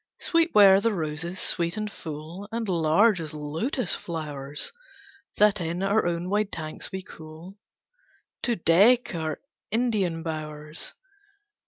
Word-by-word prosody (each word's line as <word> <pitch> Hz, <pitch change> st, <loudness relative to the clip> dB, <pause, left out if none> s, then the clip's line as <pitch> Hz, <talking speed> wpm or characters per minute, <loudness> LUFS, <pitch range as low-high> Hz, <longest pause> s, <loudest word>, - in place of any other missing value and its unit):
Sweet 335 Hz, 0 st, +1 dB
were 195 Hz, -2 st, +8 dB
the 230 Hz, -1 st, +1 dB
roses, 165 Hz, +2 st, -4 dB
sweet 170 Hz, +3 st, -2 dB
and 215 Hz, 0 st, -3 dB
full, 160 Hz, +6 st, -8 dB
And 230 Hz, -1 st, -2 dB
large 180 Hz, +3 st, +3 dB
as 155 Hz, -1 st, -6 dB
lotus 165 Hz, -, -2 dB
flowers 150 Hz, -, -5 dB, 0.7 s
That 210 Hz, -2 st, +4 dB
in 170 Hz, +3 st, -2 dB
our 200 Hz, -1 st, +2 dB
own 170 Hz, +1 st, -1 dB
wide 205 Hz, +1 st, 0 dB
tanks 155 Hz, +4 st, -5 dB
we 190 Hz, -1 st, -5 dB
cull 165 Hz, +4 st, -12 dB, 0.8 s
To 240 Hz, -, +1 dB
deck 205 Hz, +9 st, +4 dB
our 160 Hz, -2 st, -3 dB, 0.3 s
Indian 205 Hz, -8 st, 0 dB
bowers. 155 Hz, -1 st, -6 dB
175 Hz, 130 wpm, -26 LUFS, 155-210 Hz, 0.8 s, were